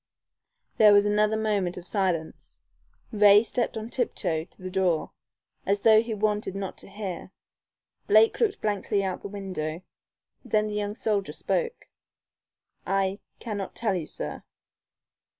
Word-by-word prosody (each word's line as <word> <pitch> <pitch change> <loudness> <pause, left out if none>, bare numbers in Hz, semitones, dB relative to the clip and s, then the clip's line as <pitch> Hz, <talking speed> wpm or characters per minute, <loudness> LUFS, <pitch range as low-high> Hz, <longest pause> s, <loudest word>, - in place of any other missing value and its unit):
There 210 -2 +7
was 205 0 +5
another 210 +1 +2
moment 205 -5 0
of 175 - -8
silence. 180 -6 -2 0.5
Ray 205 -1 +6
stepped 235 0 -2
on 220 0 -5
tiptoe 165 -10 -1
to - - -22
the 185 - -5
door 180 -4 0 0.5
as 200 +1 0
though 220 0 +6
he 230 -1 -4
wanted 210 -2 -1
not 195 -1 -4
to - - -13
hear. 195 -3 -6 0.8
Blake 215 +2 +5
looked 435 -4 +1
blankly 205 -1 0
out 190 -1 -2
of - - -26
the - - -6
window. 185 -5 -5 0.6
Then 215 -4 +1
the 210 - -4
young 205 0 -2
soldier 210 -4 -1
spoke. 475 -1 -2 1.0
"I 195 +1 0 0.2
cannot 205 -4 -5
tell 220 -4 0
you, 170 -5 -3
sir." 75 0 -6
205 Hz, 145 wpm, -26 LUFS, 190-215 Hz, 1.0 s, There